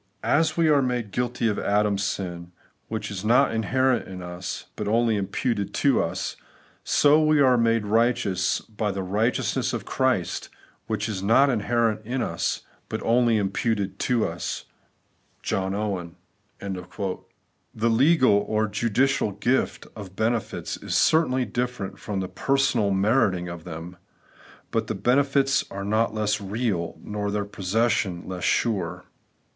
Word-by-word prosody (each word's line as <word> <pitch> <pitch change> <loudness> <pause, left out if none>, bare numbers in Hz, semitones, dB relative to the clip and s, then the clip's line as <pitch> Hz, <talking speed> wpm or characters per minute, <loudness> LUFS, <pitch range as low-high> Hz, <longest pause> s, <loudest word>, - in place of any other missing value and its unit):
'As 155 +7 +2
we 165 -1 +4
are 145 -2 +5
made 125 -5 -2
guilty 120 +2 -1
of 105 - 0
Adam's 105 -1 +1
sin, 85 -3 -4 0.4
which 110 -1 -4
is 95 -1 -5
not 120 +5 +4
inherent 130 +3 +1
in 95 -1 -8
us, 90 +1 -6
but 105 - -4
only 115 +1 +2
im 100 -2 -1
puted 100 -1 -2
to 140 -3 +3
us; - - -3 0.5
so 150 +2 +4 0.2
are 130 -3 +5
we 115 - +3
made 115 -2 +2
righteous 105 -4 +1
by 105 -1 -3
the 95 0 -3
righteousness 105 +6 0
of - - -3
Christ, - - 0 0.4
which 105 -1 -1
is 100 -4 -3
not 115 +8 +4
inherent 115 -1 +1
in 125 +4 -2
us, - - -2 0.3
but - - -3
only 120 -1 +3
imputed 100 0 -1
to 120 -3 +1
us' - - -5 0.9
(Owen). 95 -2 -2 0.4
The 100 -2 -4 1.1
legal 130 -4 +4
or 110 0 +1
judicial 115 +2 +1
gift 120 +6 0
of 100 -4 -9
benefits 110 +1 -2
is - - -4
certainly 130 -6 +3
different 120 -2 -3
from 100 -2 -3
the 95 - -3
personal 135 -3 +1
meriting 95 -3 +2
of 85 -1 -8
them; 85 +1 -8 0.7
but 110 -1 0
the 110 - -2
benefits 135 +5 +2
are 100 0 -5
not 110 +3 +1
less 105 0 -1
real, 100 -4 -2
nor 105 -1 -3
their 100 0 -1
possession 100 -2 -1
less 90 -1 -5
sure. 90 -6 0
110 Hz, 140 wpm, -25 LUFS, 100-120 Hz, 1.1 s, are